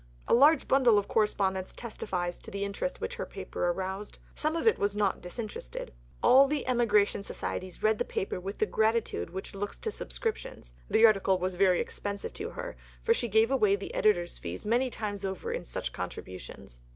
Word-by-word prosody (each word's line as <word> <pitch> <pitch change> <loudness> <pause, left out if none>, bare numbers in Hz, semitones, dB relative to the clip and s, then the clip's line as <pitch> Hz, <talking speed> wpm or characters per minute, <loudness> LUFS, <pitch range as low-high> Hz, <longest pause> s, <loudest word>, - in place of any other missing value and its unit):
A - - +3
large 290 +6 +6
bundle 250 -5 +5
of 205 - +1
correspondence 190 -3 +1
testifies 180 -6 -3
to - - -10
the 200 0 -3
interest 200 - -3
which 485 +1 -4
her - - -3
paper - - -3
aroused. 190 +3 -4 0.2
Some 310 +1 0
of 330 - -1
it 450 - +4
was 200 0 0
not 205 -2 +1
disinterested. 180 - -6 0.3
All 270 +2 +7
the 295 0 -1
emigration 210 -5 +3
societies 185 -2 -5
read 215 0 +3
the - - +2
paper 190 - -3
with 195 +2 -6
the - - +2
gratitude 220 - 0
which 190 - -6
looks 200 +1 -4
to 440 - -3
subscriptions. 435 - -5 0.2
The 225 - +6
article 195 -3 +4
was 185 +1 -2
very 185 0 +4
expensive 200 -1 -4
to 435 +2 -4
her; - - -6 0.3
for 460 - +4
she 245 - -1
gave 220 +3 +3
away 215 -7 +4
the 200 - -7
editor's 175 -5 +2
fee 85 +1 -5
many 245 +4 +2
times 205 -4 -4
over 190 -1 -3
in - - -3
such - - -4
contributions. 90 -9 -8
205 Hz, 190 wpm, -29 LUFS, 190-240 Hz, 0.3 s, All